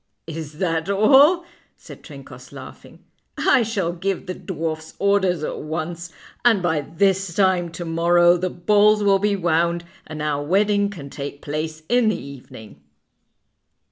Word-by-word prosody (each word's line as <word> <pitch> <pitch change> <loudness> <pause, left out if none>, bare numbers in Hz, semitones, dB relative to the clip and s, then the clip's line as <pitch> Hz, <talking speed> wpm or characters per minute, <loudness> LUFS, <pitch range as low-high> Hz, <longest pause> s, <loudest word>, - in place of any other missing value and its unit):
"Is 160 -2 -7
that 165 +1 -2
all?" 280 - +5 0.3
said - - -13
Trencoss, - - -13
laughing. - - -13 0.3
"I 260 - +3
shall 200 -7 -2
give 190 +2 -3
the 185 - -4
dwarfs 160 -3 -5
orders 190 -5 +1
at - - -4
once, 170 +2 -5 0.3
and 225 -6 +3
by 160 -3 +1
this 190 +3 0
time 185 -3 +2
to 175 +1 -6
morrow 175 +1 +3
the 185 +1 -2
balls 210 +4 +3
will 195 -1 +3
be 205 0 +1
wound, 170 -1 0 0.2
and 155 -1 -8
our 145 -1 -1
wedding 200 +5 +1
can 145 -9 -10
take 140 0 -7
place 155 +1 -5
in 240 -2 +3
the 215 - -2
evening." 130 -6 -12
175 Hz, 145 wpm, -21 LUFS, 160-200 Hz, 0.3 s, all